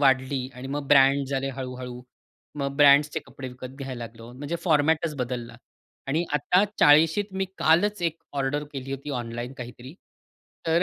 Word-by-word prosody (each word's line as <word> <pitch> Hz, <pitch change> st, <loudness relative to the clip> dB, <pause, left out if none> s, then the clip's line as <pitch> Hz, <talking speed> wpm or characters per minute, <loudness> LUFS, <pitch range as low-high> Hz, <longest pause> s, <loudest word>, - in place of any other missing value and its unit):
वाढली 130 Hz, -1 st, +2 dB
आणि 125 Hz, +1 st, -8 dB
मग 145 Hz, +1 st, -3 dB
ब्रँड 140 Hz, 0 st, +5 dB
झाले 135 Hz, 0 st, -1 dB
हळू-हळू. 125 Hz, -1 st, -6 dB, 0.6 s
मग 140 Hz, -1 st, -2 dB
ब्रँड्सचे 145 Hz, +1 st, +5 dB
कपडे 130 Hz, -1 st, -8 dB
विकत 125 Hz, +1 st, -9 dB
घ्यायला 130 Hz, -3 st, -5 dB
लागलो, 115 Hz, +1 st, -11 dB
म्हणजे 145 Hz, +6 st, -4 dB
फॉर्मॅटच 155 Hz, 0 st, +2 dB
बदलला 125 Hz, -2 st, -4 dB, 0.5 s
आणि 155 Hz, +5 st, 0 dB
आता 180 Hz, +7 st, +3 dB
40शी 160 Hz, +7 st, +5 dB
मी 190 Hz, 0 st, -1 dB
कालच 180 Hz, +5 st, +3 dB
1 165 Hz, -1 st, -1 dB
ऑर्डर 140 Hz, +1 st, -1 dB
केली 135 Hz, -1 st, -6 dB
होती 140 Hz, +2 st, -5 dB
ऑनलाईन 120 Hz, +2 st, -5 dB
काहीतरी, 125 Hz, +4 st, -9 dB, 0.7 s
तर 165 Hz, +2 st, +3 dB
140 Hz, 150 wpm, -26 LUFS, 130-150 Hz, 0.7 s, ब्रँड